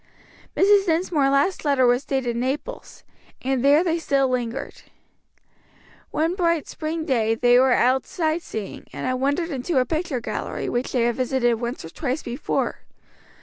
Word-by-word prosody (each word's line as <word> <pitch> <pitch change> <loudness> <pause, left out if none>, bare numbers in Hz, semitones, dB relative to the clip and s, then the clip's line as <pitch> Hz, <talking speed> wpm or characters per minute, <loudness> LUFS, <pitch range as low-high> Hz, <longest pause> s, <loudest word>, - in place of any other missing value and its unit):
Mrs. 400 0 +5
Dinsmore's 320 -4 +2
last 280 +7 +1
letter 280 -4 +3
was 245 +3 +2
dated 260 -4 -1
Naples, 270 - -4 0.4
and 260 -1 0
there 290 +4 +5
they 335 -2 0
still 275 -4 +1
lingered. 245 -2 -3 1.3
One 325 +3 0
bright 335 -4 0
spring 315 0 -4
day 225 -6 +1
they 245 +1 +4
were 260 0 +4
out 255 +2 +2
sight 320 -1 -1
seeing, 215 - -7
and - - -5
had 255 - 0
wandered 285 +6 0
into 275 +3 -2
a 255 - +4
picture 315 -4 -2
gallery 235 - -4
which 245 +2 -2
they 245 -3 +1
had 235 0 0
visited 245 -2 +1
once 240 -6 -4
or - - -8
twice 275 - -3
before. 245 +5 -2
270 Hz, 160 wpm, -23 LUFS, 245-320 Hz, 1.3 s, Mrs